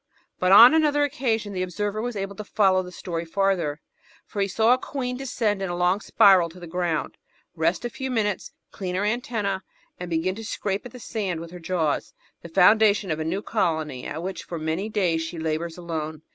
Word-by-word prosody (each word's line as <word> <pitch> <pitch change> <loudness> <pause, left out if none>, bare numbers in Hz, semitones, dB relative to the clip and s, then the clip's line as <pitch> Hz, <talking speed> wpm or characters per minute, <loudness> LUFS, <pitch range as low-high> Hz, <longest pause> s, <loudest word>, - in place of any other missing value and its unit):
But 185 0 +2
on 235 +7 +10
another 300 -2 +3
occasion 225 -7 -1
the 185 - -2
observer 205 +4 -2
was 240 0 -3
able 195 0 -4
to 210 - -5
follow 190 -3 +3
the 180 -1 -9
story 170 -2 -4
farther, 170 -4 0 0.4
for 205 - -4
he 195 - +2
saw 220 +5 +3
a 255 - +1
queen 250 -2 -4
descend 230 -6 -1
in 190 - -2
a 175 - -2
long 180 +2 +2
spiral 190 -6 +5
to 175 +3 -14
the 175 - -8
ground, 170 -2 -2 0.4
rest 170 +6 0
a - - -1
few 265 +3 -5
minutes, 210 -5 -1 0.2
clean 180 -2 -4
her 200 +2 0
antennas, 210 -4 -1 0.4
and 180 -1 -5
begin 170 +3 0
to 225 +3 -8
scrape 205 +1 -3
at - - -16
the 250 - -11
sand 200 -7 -3
with 165 0 -8
her 180 - -9
jaws 165 -3 -1
— - - -44
^the 170 - -9
foimdation 205 +1 +5
of 155 - -1
a - - -1
new 180 +6 -2
colony 155 - -1
at 160 +3 -5
which 190 +1 -5
for 170 - -6
many 160 +6 -2
days 180 -7 +1
she 165 +1 -5
labours 160 +1 -3
alone. 160 -3 -5
190 Hz, 215 wpm, -25 LUFS, 170-215 Hz, 0.4 s, on